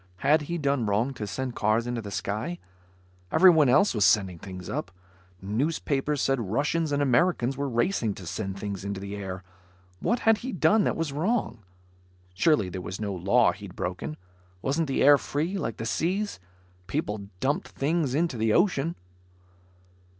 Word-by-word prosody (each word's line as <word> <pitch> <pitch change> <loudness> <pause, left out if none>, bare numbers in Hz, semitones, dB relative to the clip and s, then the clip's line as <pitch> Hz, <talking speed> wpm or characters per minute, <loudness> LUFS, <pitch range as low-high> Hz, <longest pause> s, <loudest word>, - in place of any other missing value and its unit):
Had 155 +2 +5
he 170 - -1
done 140 -6 0
wrong 110 +7 +1
to 110 -5 -5
send 125 +4 -4
cars 110 +2 +1
into 120 -1 -3
the 105 - -7
sky? 110 - -3 0.7
Everyone 160 -4 +6
else 195 +11 +4
was 105 -3 +1
sending 90 -2 +3
things 90 0 -8
up. - - -3 0.5
Newspapers 140 +5 -1
said 135 -2 +1
Russians 150 +7 0
and 145 0 +1
Americans 135 -1 +2
were 140 +1 -2
racing 120 - 0
to 95 - -10
send 95 +2 -4
things 100 -1 -5
into 100 -1 -4
the 100 +1 -6
air. 95 -2 -6 0.6
What 235 - 0
had 225 -1 +4
he 260 0 -5
done 185 +5 +3
that - - +1
was 165 -4 -2
wrong? 165 - -1 0.7
Surely 150 - +3
there 90 0 -5
was 95 +2 -6
no 105 -2 -2
law 100 +7 +3
he'd 100 -4 -10
broken. 75 -5 -4 0.5
Wasn't 150 +4 0
the 135 - +1
air 145 0 +7
free, 160 +7 -2
like 115 - -3
the 115 - -4
seas? 185 - -1 0.5
People 100 +1 -3
dumped 140 +6 0
things 145 -2 -1
into 160 -5 0
the 110 -1 +2
ocean. 170 -3 +2
125 Hz, 165 wpm, -27 LUFS, 100-155 Hz, 0.7 s, air